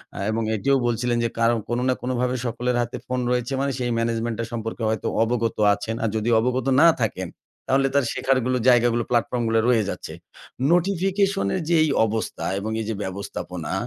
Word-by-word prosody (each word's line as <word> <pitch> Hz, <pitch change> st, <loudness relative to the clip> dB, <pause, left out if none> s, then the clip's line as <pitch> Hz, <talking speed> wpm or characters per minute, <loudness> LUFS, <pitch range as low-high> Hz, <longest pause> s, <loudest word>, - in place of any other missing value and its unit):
আ -, -, -8 dB
এবং 115 Hz, +1 st, -1 dB
এটিও 135 Hz, +6 st, +2 dB
বলছিলেন, 120 Hz, +1 st, 0 dB
যে, 115 Hz, -, +1 dB
কারো 115 Hz, +1 st, +3 dB
কোন 120 Hz, 0 st, 0 dB
না -, -, +4 dB
কোনভাবে 125 Hz, 0 st, -1 dB
সকলের 125 Hz, +2 st, -1 dB
হাতে 120 Hz, 0 st, -4 dB
ফোন 125 Hz, 0 st, -1 dB
রয়েছে 125 Hz, +1 st, -1 dB
মানে 140 Hz, -, 0 dB
সেই 125 Hz, -, -1 dB
management 115 Hz, 0 st, -1 dB
টা -, -, 0 dB
সম্পর্কে 115 Hz, 0 st, -4 dB
হয়তো 110 Hz, -3 st, -2 dB, 0.2 s
অবগত 115 Hz, -1 st, -1 dB, 0.2 s
আছেন। 105 Hz, +3 st, -4 dB
আর 115 Hz, -, +1 dB
যদি 110 Hz, +2 st, 0 dB
অবগত 125 Hz, +2 st, 0 dB, 0.2 s
না 170 Hz, -, +8 dB, 0.2 s
থাকেন 95 Hz, -5 st, -3 dB, 0.4 s
তাহলে 135 Hz, +1 st, +3 dB
তার 140 Hz, -, +3 dB
শেখারগুলো 130 Hz, -1 st, +1 dB
জায়গাগুলো 120 Hz, -1 st, +4 dB
প্লাটফর্ম 120 Hz, 0 st, 0 dB
গুলা 115 Hz, 0 st, +2 dB
রয়েছে। 110 Hz, -5 st, 0 dB, 0.6 s
নোটিফিকেশন 195 Hz, +2 st, +1 dB
এর 185 Hz, -, -1 dB
যে, 170 Hz, -, +4 dB
এই 155 Hz, -, +1 dB, 0.2 s
অবস্থা 110 Hz, 0 st, -3 dB
এবং 110 Hz, +2 st, -4 dB
এই -, -, -4 dB
যে, -, -, 0 dB
ব্যবস্থাপনা, 95 Hz, -3 st, -5 dB
120 Hz, 180 wpm, -23 LUFS, 115-130 Hz, 0.6 s, না